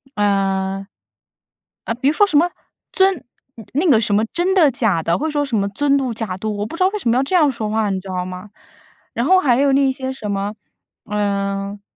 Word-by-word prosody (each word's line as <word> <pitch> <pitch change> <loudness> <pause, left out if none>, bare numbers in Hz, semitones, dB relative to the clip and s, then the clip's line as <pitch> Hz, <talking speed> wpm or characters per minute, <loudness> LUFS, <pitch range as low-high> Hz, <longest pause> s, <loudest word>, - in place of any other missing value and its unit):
呃 195 -1 0 1.0
呃， - - -1
比 260 +3 -1
如 - - +1
说 410 +3 +4
什 310 - -3
么 345 +4 +4 0.4
尊 380 -4 +2 0.5
那 315 +5 +1
个 225 -5 +5
什 210 -2 0
么 215 +2 +2
真 360 +2 +1
的 335 -6 +5
假 220 -10 +1
的， 170 +2 0
或 300 - -3
者 - - -3
说 290 -1 0
什 260 - -3
么 200 -1 0
尊 280 +7 +1
嘟 260 -4 -2
假 215 -5 -4
嘟， 215 +2 -3
我 205 - -2
不 225 - -7
知 350 - -7
道 370 - +5
为 420 +1 -4
什 235 - -1
么 230 - +3
要 260 - +2
这 275 - -5
样 305 -5 +5
说 225 -4 -3
话， 215 -1 0
你 190 -1 -1
知 190 - -11
道 180 -1 -3
吗？ 185 +2 -8 0.6
然 235 - -1
后 375 +5 +5
还 260 -9 +3
有 280 +1 +3
那 275 0 +3
些 260 0 -4
什 220 -6 -6
么， 200 +1 -2 0.5
嗯 200 -1 -2
225 Hz, 250 characters per minute, -19 LUFS, 200-285 Hz, 1.0 s, 个